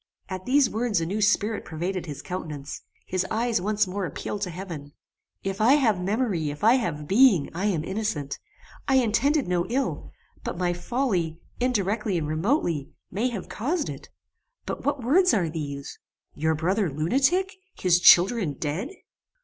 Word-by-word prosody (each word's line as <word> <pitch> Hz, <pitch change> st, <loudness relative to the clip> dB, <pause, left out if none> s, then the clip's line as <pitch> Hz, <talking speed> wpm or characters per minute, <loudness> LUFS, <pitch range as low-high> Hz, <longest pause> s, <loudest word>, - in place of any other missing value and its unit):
At 185 Hz, +1 st, -6 dB
these 275 Hz, 0 st, +5 dB
words 220 Hz, -3 st, 0 dB
a 165 Hz, -, -1 dB
new 200 Hz, +6 st, -2 dB
spirit 210 Hz, +1 st, +2 dB
pervaded 175 Hz, +2 st, -4 dB
his 145 Hz, -1 st, -7 dB
countenance. 150 Hz, -6 st, -6 dB, 0.2 s
His 185 Hz, 0 st, -1 dB
eyes 225 Hz, -2 st, 0 dB
once 210 Hz, +2 st, +1 dB
more 190 Hz, 0 st, -3 dB
appealed 200 Hz, +6 st, -5 dB
to 190 Hz, -, -1 dB
heaven. 165 Hz, -5 st, -7 dB, 0.5 s
"If 195 Hz, +1 st, -3 dB
I 235 Hz, +5 st, +6 dB
have 225 Hz, -10 st, +3 dB
memory, 195 Hz, -, 0 dB
if 145 Hz, +4 st, -7 dB
I 225 Hz, +2 st, +7 dB
have 150 Hz, -, -3 dB
being, 200 Hz, -, +5 dB
I 180 Hz, +4 st, -2 dB
am 180 Hz, -7 st, +1 dB
innocent. 165 Hz, -8 st, -3 dB, 0.5 s
I 270 Hz, -, +3 dB
intended 265 Hz, +3 st, +2 dB
no 180 Hz, 0 st, 0 dB
ill; 265 Hz, +3 st, -2 dB, 0.3 s
but -, -, -4 dB
my 175 Hz, -1 st, +1 dB
folly, 175 Hz, -5 st, -1 dB, 0.2 s
indirectly 210 Hz, -5 st, 0 dB
and 155 Hz, -3 st, -2 dB
remotely, 160 Hz, -, 0 dB, 0.2 s
may 230 Hz, +6 st, 0 dB
have 215 Hz, -6 st, -6 dB
caused 295 Hz, +8 st, -2 dB
it; -, -, -8 dB, 0.6 s
but -, -, -5 dB
what 280 Hz, -3 st, -1 dB
words 360 Hz, +10 st, +4 dB
are 175 Hz, -6 st, +1 dB
these! 140 Hz, -3 st, -6 dB, 0.3 s
Your 160 Hz, +1 st, 0 dB
brother 185 Hz, +4 st, +1 dB
lunatic! 270 Hz, -, +1 dB, 0.2 s
His 180 Hz, -1 st, +3 dB
children 180 Hz, -1 st, +6 dB
dead!" 155 Hz, -, -3 dB
195 Hz, 160 wpm, -26 LUFS, 165-235 Hz, 0.6 s, I